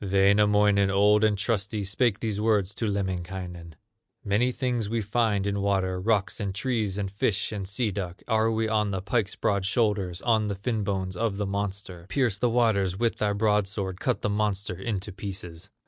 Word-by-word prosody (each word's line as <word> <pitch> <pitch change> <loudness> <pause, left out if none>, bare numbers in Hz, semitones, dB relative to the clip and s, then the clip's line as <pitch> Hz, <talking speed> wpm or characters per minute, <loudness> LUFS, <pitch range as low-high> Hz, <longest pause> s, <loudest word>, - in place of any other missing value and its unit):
Wainamoinen, 100 +1 +4
old 105 +2 +4
and 105 -1 +3
trusty, 105 0 -1
Spake 105 +2 0
these 105 -2 -2
words 105 -3 +1
to 115 - -2
Lemminkainen: 90 -4 -4 0.5
"Many 110 +5 +2
things 125 -5 -2
we 115 +1 0
find 105 -1 0
in 100 0 -1
water, 95 -2 0
Rocks, 105 -1 +1
and 100 -3 -3
trees, 110 -4 -1
and 100 -2 -3
fish, 100 +1 0
and 100 -3 -4
sea 105 +2 0
duck; 90 -2 -5
Are 110 -1 +2
we 110 0 0
on 105 -1 +1
the 95 -1 -3
pike's 105 0 0
broad 100 -2 0
shoulders, 100 -4 0
On 110 -3 +2
the 100 - -2
fin 110 +2 -2
bones 95 -2 -2
of 110 -1 -1
the 105 - -1
monster, 100 -3 -4
Pierce 115 -3 +1
the 120 - +2
waters 105 -6 +2
with 115 +1 0
thy 105 -1 0
broadsword, 100 -3 0
Cut - - -1
the - - +1
monster 100 -2 -1
into 100 +1 -4
pieces." 95 -2 -7
100 Hz, 180 wpm, -26 LUFS, 95-110 Hz, 0.5 s, Wainamoinen